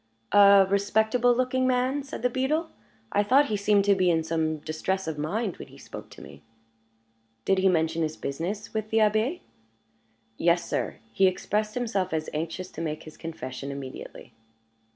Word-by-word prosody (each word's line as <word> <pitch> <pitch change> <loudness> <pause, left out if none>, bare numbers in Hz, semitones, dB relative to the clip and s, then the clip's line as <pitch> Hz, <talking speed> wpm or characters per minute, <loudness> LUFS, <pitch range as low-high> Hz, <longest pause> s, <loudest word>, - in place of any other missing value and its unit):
"A 200 -1 +7
respectable 220 +5 +2
looking 255 +1 +1
man," 255 +3 +1
said 275 -3 -8
the 250 - +3
beadle. 300 +6 0 0.4
"I 205 - +3
thought 265 +7 +4
he 215 - 0
seemed 200 0 +2
to 205 - +5
be 185 -2 +2
in 165 -1 +2
some 160 -1 -1
distress 160 +5 -3
of 155 -2 -4
mind 195 +7 -2
when - - -9
he - - -16
spoke - - -10
to - - -12
me." - - -13 1.0
"Did 195 -1 +3
he 190 0 +4
mention 165 -1 +1
his 155 -1 -2
business 180 +9 -4
with 215 -1 -3
the 220 - 0
Abbé?" 220 +9 +2 1.0
"Yes, 170 0 +2
sir; - - -2 0.2
he 190 - +4
expressed 210 +3 -1
himself 220 -8 -1
as 155 0 -2
anxious 165 +4 -4
to - - -7
make 155 -2 -4
his 155 - -12
confession 140 -5 -7
immediately." 140 -1 -9
200 Hz, 175 wpm, -26 LUFS, 160-225 Hz, 1.0 s, A